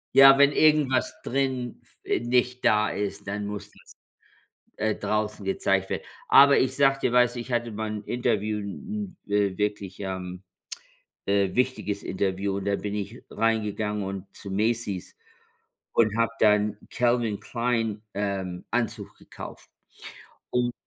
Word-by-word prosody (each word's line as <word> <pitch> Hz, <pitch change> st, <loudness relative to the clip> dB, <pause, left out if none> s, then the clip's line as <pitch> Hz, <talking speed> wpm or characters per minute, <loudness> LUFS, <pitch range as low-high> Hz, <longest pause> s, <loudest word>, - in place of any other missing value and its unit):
Ja, 135 Hz, 0 st, +9 dB
wenn 140 Hz, 0 st, +6 dB
irgendwas 150 Hz, -5 st, +3 dB
drin 130 Hz, -2 st, -1 dB
f -, -, -19 dB
äh, -, -, 0 dB
nicht 125 Hz, +1 st, 0 dB
da 105 Hz, 0 st, +4 dB
ist, 100 Hz, 0 st, -4 dB
dann 100 Hz, +1 st, -3 dB
muss 105 Hz, 0 st, -6 dB
das -, -, -18 dB, 0.8 s
äh, 110 Hz, 0 st, 0 dB
draußen 105 Hz, -1 st, -2 dB
gezeigt 95 Hz, 0 st, 0 dB
wird. -, -, -3 dB, 0.2 s
Aber 140 Hz, 0 st, +8 dB
ich 130 Hz, -, +1 dB
sage 135 Hz, -1 st, +3 dB
dir, 125 Hz, -, +1 dB
weißt 125 Hz, -1 st, +4 dB
du, 120 Hz, -, -4 dB
ich 120 Hz, -, -8 dB
hatte 120 Hz, -1 st, -1 dB
mal 110 Hz, +1 st, -3 dB
'n 105 Hz, -1 st, -5 dB
Interview 110 Hz, -3 st, 0 dB
'n 200 Hz, -, -6 dB
'n, 100 Hz, -1 st, +1 dB
wirklich, 105 Hz, -2 st, -2 dB
ähm, 95 Hz, -1 st, -5 dB, 0.8 s
äh, 100 Hz, -1 st, +2 dB
wichtiges 125 Hz, -5 st, -1 dB
Interview. 95 Hz, +1 st, -1 dB
Und 100 Hz, -, -5 dB
da 100 Hz, 0 st, +1 dB
bin 105 Hz, +1 st, -4 dB
ich 105 Hz, +3 st, -5 dB
reingegangen 105 Hz, -2 st, 0 dB
und 95 Hz, 0 st, -5 dB
zu 100 Hz, -, -8 dB
Macy's 105 Hz, -2 st, -1 dB, 0.8 s
und 110 Hz, -2 st, +3 dB
habe 115 Hz, 0 st, +2 dB
dann 105 Hz, -1 st, +4 dB
Calvin 120 Hz, -4 st, +1 dB
Klein, 115 Hz, -3 st, -1 dB
ähm, 95 Hz, -3 st, -3 dB
Anzug 115 Hz, -3 st, -2 dB
gekauft. -, -, -11 dB, 0.8 s
Und 120 Hz, 0 st, +1 dB
105 Hz, 145 wpm, -26 LUFS, 100-120 Hz, 0.8 s, Ja